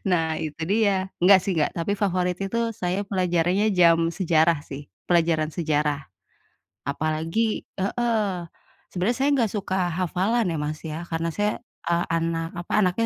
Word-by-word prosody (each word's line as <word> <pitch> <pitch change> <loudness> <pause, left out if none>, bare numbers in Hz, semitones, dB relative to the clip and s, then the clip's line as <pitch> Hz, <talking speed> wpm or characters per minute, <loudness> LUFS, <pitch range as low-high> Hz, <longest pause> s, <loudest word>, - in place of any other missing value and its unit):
Nah, 160 -3 +1
itu 155 +1 -5
dia. 195 -1 +1
Enggak 190 +2 +7
sih 195 - 0
enggak, 155 -4 +1
tapi 170 +4 -1
favorit 180 -3 0
itu 230 +4 -1
saya 190 0 -2
pelajarannya 185 0 +1
jam 165 -1 +5
sejarah 165 -3 +2
sih. 140 +1 -9 0.2
Pelajaran 165 -3 +2
sejarah. 150 -3 0 0.9
Apalagi 160 +9 -1 0.2
heeh, 210 -1 0 0.5
sebenarnya 195 +7 -1
saya 280 - +3
nggak 230 -5 +1
suka 195 -2 -2 0.2
hafalan 185 +5 0
ya, 165 - -2
Mas, 150 +1 -3
ya. 160 +1 -5
Karena 165 0 -2
saya, 205 +5 -1 0.2
ah, 170 0 +1
anak, 165 0 -1 0.2
apa, - - -10
anaknya 190 +4 +1
175 Hz, 145 wpm, -24 LUFS, 165-200 Hz, 0.9 s, Enggak